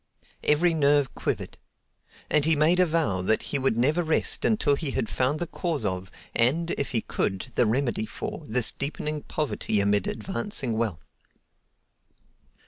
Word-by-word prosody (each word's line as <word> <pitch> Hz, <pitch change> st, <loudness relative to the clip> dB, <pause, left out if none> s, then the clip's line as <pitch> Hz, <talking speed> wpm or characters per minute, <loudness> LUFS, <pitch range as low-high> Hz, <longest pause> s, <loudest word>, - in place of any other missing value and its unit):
Every 165 Hz, +3 st, +3 dB
nerve 145 Hz, -3 st, +2 dB
quivered. -, -, -3 dB, 0.7 s
And 150 Hz, -, +2 dB
he 160 Hz, +1 st, +4 dB
made 160 Hz, +5 st, +3 dB
a 180 Hz, -, +5 dB
vow 155 Hz, -, 0 dB
that 110 Hz, +4 st, +1 dB
he 140 Hz, -, +2 dB
would 130 Hz, -4 st, +1 dB
never 150 Hz, +8 st, +2 dB
rest 160 Hz, -2 st, 0 dB
until 215 Hz, -9 st, +3 dB
he 145 Hz, +1 st, -1 dB
had -, -, 0 dB
found 130 Hz, +6 st, 0 dB
the 175 Hz, -, -1 dB
cause 165 Hz, -, -2 dB
of, 95 Hz, -1 st, -2 dB, 0.2 s
and, 160 Hz, +9 st, +2 dB
if 140 Hz, -, -2 dB
he 115 Hz, -, 0 dB
could, 95 Hz, +5 st, -2 dB
the 120 Hz, -, +3 dB
remedy 120 Hz, -2 st, 0 dB
for, 155 Hz, -, -6 dB
this 120 Hz, 0 st, +2 dB
deepening 150 Hz, +1 st, -2 dB
poverty 145 Hz, -9 st, -1 dB
amid 100 Hz, -1 st, +2 dB
advancing 190 Hz, -, -2 dB
wealth. 110 Hz, -8 st, -2 dB
140 Hz, 155 wpm, -26 LUFS, 110-155 Hz, 0.7 s, a